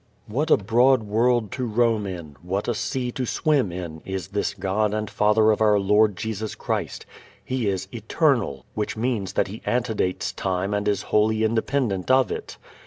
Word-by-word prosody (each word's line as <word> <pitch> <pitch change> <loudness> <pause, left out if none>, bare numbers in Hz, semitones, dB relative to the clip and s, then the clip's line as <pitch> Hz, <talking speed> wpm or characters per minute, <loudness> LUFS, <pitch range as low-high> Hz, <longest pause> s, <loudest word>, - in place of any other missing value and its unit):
What 145 +9 -2
a - - +6
broad 120 +5 +3
world 115 +1 +1
to 130 -2 -3
roam 115 -2 +1
in, 85 -6 -7
what 95 +4 -3
a 120 - +1
sea 125 +2 -2
to 125 0 -3
swim 140 - +1
in 85 -3 -6
is 95 -3 -5
this 100 0 -2
God 100 +2 0
and 110 0 -2
Father 105 +2 +3
of 110 - 0
our 105 -1 +5
Lord 105 +1 +3
Jesus 110 -1 -4
Christ. - - -3 0.4
He 130 -4 -1
is 95 -1 -1
eternal, 115 - 0
which 105 0 -3
means 110 -5 -1
that - - +1
He 105 +3 -8
antedates 115 -7 -1
time 95 +1 -2
and 105 0 -1
is 100 -1 +1
wholly 110 +1 +3
independent 110 -3 0
of 130 0 +4
it. - - -6
105 Hz, 175 wpm, -24 LUFS, 100-120 Hz, 0.4 s, a